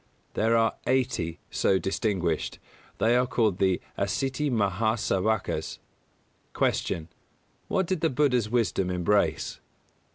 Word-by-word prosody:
There 115 +1 +2
are 115 -1 +2
eighty 125 -11 0
so 95 - +2
distinguished. 95 -3 -1 0.4
They 115 +2 +3
are 125 +1 +3
called 110 -7 +1
the 95 -2 +2 0.2
Asīti 135 +9 0
Mahā 110 0 +1
Sāvakas. 110 +1 -1 0.8
250. - - +1
Q. 80 -1 -9 0.6
_What 190 - +1
did 180 -2 -2
the 160 - +3
Buddha's 125 -5 +2
wisdom 110 -5 +1
embrace? 90 +3 +1
110 Hz, 120 wpm, -27 LUFS, 95-125 Hz, 0.8 s, They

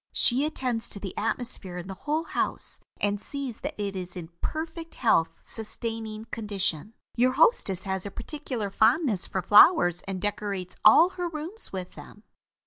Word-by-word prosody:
She 260 +4 +4
attends 250 -6 -2
to 200 - -2
the 195 -2 -7
atmosphere 220 -4 -2
in 175 - -6
the 195 - -5
whole 300 - -2
house, - - -3 0.2
and 205 0 -1
sees 275 -4 -6
that - - -6
it 200 -1 -3
is 180 -1 -6
in 170 -3 -7
perfect 325 +1 -5
health 190 -9 +2
sustaining 225 0 -1
condition. 205 -3 -1 0.2
Your 255 +2 +3
hostess 260 - +3
has 190 -1 -3
a 200 - -5
particular 235 -2 -5
fondness 225 - +3
for 190 - -3
flowers 180 - +6
and 190 -1 -3
decorates 200 -2 -3
all 320 +11 +7
her 355 -2 -4
rooms 330 +7 -4
with 185 -2 -5
them. 210 - -13
215 Hz, 160 wpm, -27 LUFS, 195-275 Hz, 0.2 s, all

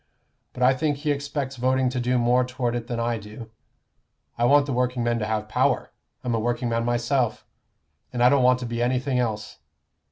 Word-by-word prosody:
But 125 - -2
I 130 +1 +6
think 145 +2 -1
he 150 +1 -1
expects 140 -1 -3
voting 130 +1 +2
to 125 0 -3
do 125 +1 +1
more 120 +1 +3
toward 125 -1 -2
it 120 -1 -4
than 120 -1 -3
I 115 -1 -1
do. 110 +2 -11 0.8
I 120 - +1
want 145 +2 +5
the 140 - -3
workingmen 120 -1 0
to 105 - -2
have 110 -1 -2
power. - - 0 0.3
I'm 125 - -1
a 115 - +1
workingman 120 0 -1
myself, 120 0 0 0.7
and 120 - 0
I 125 - +7
don't 140 0 +3
want 125 0 +5
to - - -3
be 120 0 -3
anything 125 +1 0
else. 110 - -3
125 Hz, 195 wpm, -24 LUFS, 120-130 Hz, 0.8 s, I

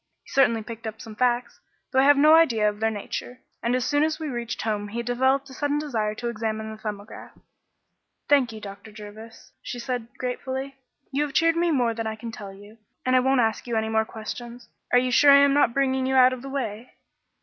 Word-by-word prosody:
He - - -19
certainly 230 -5 +3
picked 225 +1 -8
up 220 0 -7
some 220 -1 -10
facts, 245 +1 0 0.3
though 260 - +3
I 270 - +5
have 290 0 +6
no 305 +2 +6
idea 240 -10 +4
of 210 0 -2
their 220 0 +2
nature, 220 +4 -6 0.2
and 235 +1 0
as 255 -1 0
soon 290 +1 +1
as 315 0 -1
we 310 -2 -4
reached 240 -2 -4
home 210 -2 -2
he 235 +3 -4
developed 260 +3 +1
a - - -10
sudden 290 +2 -1
desire 225 -8 -2
to 240 - -5
examine 220 -1 -3
the 220 - -9
'Thumbograph.'" 210 -1 -8 0.9
"Thank 275 -5 +3
you, 220 - -8
Dr. 200 +1 -10
Jervis," 215 +2 -12
she - - -6
said 245 -1 -4
gratefully. 265 +2 -4 0.4
"You 280 +2 0
have 295 -2 -2
cheered 330 0 +3
me 340 +1 +1
more 245 -7 +1
than 225 0 -4
I 220 - -3
can 230 +1 -7
tell 205 -3 -8
you, 205 +3 -15 0.3
and 255 0 +3
I - - +6
won't 265 0 +3
ask 225 +1 -1
you 235 - -2
any 220 0 0
more 220 0 +2
questions. 235 +2 -8 0.2
Are - - +6
you 250 0 +2
sure 285 +4 +6
I 280 - +9
am 280 -1 +4
not 285 -4 +4
bringing 265 0 0
you 265 - 0
out 255 0 +6
of 255 - -7
the 275 - -8
way?" 240 -4 -5
240 Hz, 230 wpm, -25 LUFS, 220-270 Hz, 0.9 s, I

